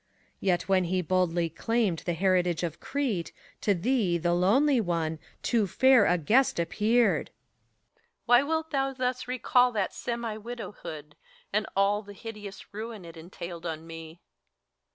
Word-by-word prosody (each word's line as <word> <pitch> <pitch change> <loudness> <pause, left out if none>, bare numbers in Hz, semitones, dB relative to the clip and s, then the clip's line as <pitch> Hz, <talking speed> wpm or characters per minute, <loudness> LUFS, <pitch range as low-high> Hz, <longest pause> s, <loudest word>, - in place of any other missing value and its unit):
PHORKYAS. - - -13
Yet 175 -2 +3
when 190 -1 +3
he 185 +2 0
boldly 175 -1 +1
claimed 200 +1 0
the 175 - -3
heritage 180 -1 +1
of 165 -2 -3
Crete, 245 -12 -2 0.3
To 205 - +2
thee, 200 -2 +1
the 175 +1 0
lonely 240 +10 +3
one, 165 -4 -1 0.2
too 225 -4 +2
fair 260 +3 +5
a 180 - +3
guest 225 - +2
appeared. 210 +1 +2
HELENA. 115 -2 -43 0.2
Why 245 +1 +6
wilt 320 +2 -2
thou 270 -2 0
thus 255 -1 -2
recall 250 0 +3
that 205 -3 -1
semi 235 -2 -4
widowhood, 205 -10 -8 0.4
And 210 +1 +1
all 200 +1 +2
the 205 -1 -12
hideous 205 -2 -9
ruin 215 -2 -6
it 165 0 -11
entailed 170 0 -8
on 160 0 -5
met 165 - -9
PHORKYAS. 165 +1 -10
195 Hz, 155 wpm, -28 LUFS, 170-235 Hz, 0.4 s, Why